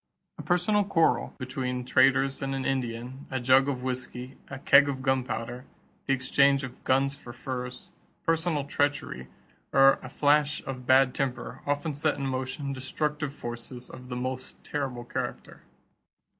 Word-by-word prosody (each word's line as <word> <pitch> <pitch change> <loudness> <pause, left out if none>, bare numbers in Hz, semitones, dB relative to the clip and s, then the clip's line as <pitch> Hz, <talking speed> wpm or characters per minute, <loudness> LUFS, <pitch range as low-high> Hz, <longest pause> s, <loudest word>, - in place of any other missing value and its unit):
A - - -3
personal 185 +4 +2
quarrel 165 -11 +2
between 130 -1 -3
traders 135 +2 +3
and 135 0 -2
an 135 - -3
Indian, 125 +1 -3
a 130 - -2
jug 130 +2 +5
of 125 -3 -3
whisky, 130 0 -4
a 135 - -6
keg 140 +1 +6
of 130 -1 -4
gunpowder, 125 -1 -1 0.4
the 135 - +3
exchange 140 +1 +3
of 130 -2 -8
guns 135 +1 +2
for 120 - -11
furs, 125 0 -6 0.3
personal 165 -2 +1
treachery, 145 - -1 0.4
or 135 0 +6
a 130 - -8
flash 145 +1 +2
of 130 -2 -6
bad 130 -1 +5
temper 125 -4 -3
often 145 +2 0
set 150 +1 0
in 140 - -3
motion 135 +2 -3
destructive 145 +2 -2
forces 120 -2 -7
of 125 0 -11
the 125 - -4
most 130 +1 -5
terrible 135 -4 -3
character. - - -5
135 Hz, 150 wpm, -28 LUFS, 125-140 Hz, 0.4 s, keg